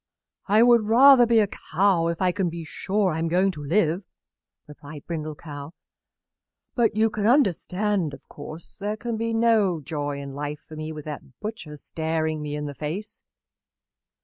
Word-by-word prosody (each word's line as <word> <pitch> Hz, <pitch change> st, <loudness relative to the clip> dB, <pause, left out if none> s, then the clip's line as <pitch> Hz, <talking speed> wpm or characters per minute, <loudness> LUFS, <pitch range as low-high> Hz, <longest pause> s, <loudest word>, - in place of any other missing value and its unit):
"I 210 Hz, +3 st, +5 dB
would 235 Hz, -3 st, +5 dB
rather 250 Hz, +2 st, +7 dB
be 230 Hz, 0 st, +4 dB
a 210 Hz, -2 st, +4 dB, 0.3 s
cow 180 Hz, -1 st, +3 dB
if 170 Hz, +2 st, -2 dB
I 180 Hz, -, +3 dB
can 185 Hz, -1 st, -1 dB
be 165 Hz, 0 st, -6 dB
sure 190 Hz, +5 st, -1 dB
I 160 Hz, -, -2 dB
am 165 Hz, -, 0 dB
going 185 Hz, +4 st, +2 dB
to 150 Hz, -5 st, -9 dB
live," 170 Hz, +3 st, +1 dB, 0.6 s
replied 145 Hz, 0 st, -11 dB
Brindle 155 Hz, -2 st, -4 dB
Cow. 145 Hz, 0 st, -9 dB, 1.0 s
"But 230 Hz, -4 st, +2 dB
you 220 Hz, 0 st, +3 dB
can 210 Hz, 0 st, -1 dB
understand, 200 Hz, -, +1 dB
of -, -, -20 dB
course, 155 Hz, +2 st, -10 dB
there 210 Hz, +2 st, -4 dB
can 235 Hz, +1 st, -3 dB
be 230 Hz, +1 st, -2 dB
no 225 Hz, -6 st, +3 dB
joy 145 Hz, -1 st, -4 dB
in 140 Hz, -1 st, -7 dB
life 145 Hz, +1 st, -5 dB
for 155 Hz, -, -10 dB
me 155 Hz, 0 st, -5 dB
with 150 Hz, -2 st, -8 dB
that 145 Hz, -4 st, -9 dB
butcher 210 Hz, -8 st, -6 dB
staring 160 Hz, 0 st, -2 dB
me 150 Hz, 0 st, -4 dB
in 150 Hz, 0 st, -4 dB
the 145 Hz, -, -5 dB
face." 190 Hz, +10 st, -6 dB
175 Hz, 175 wpm, -25 LUFS, 155-215 Hz, 1.0 s, rather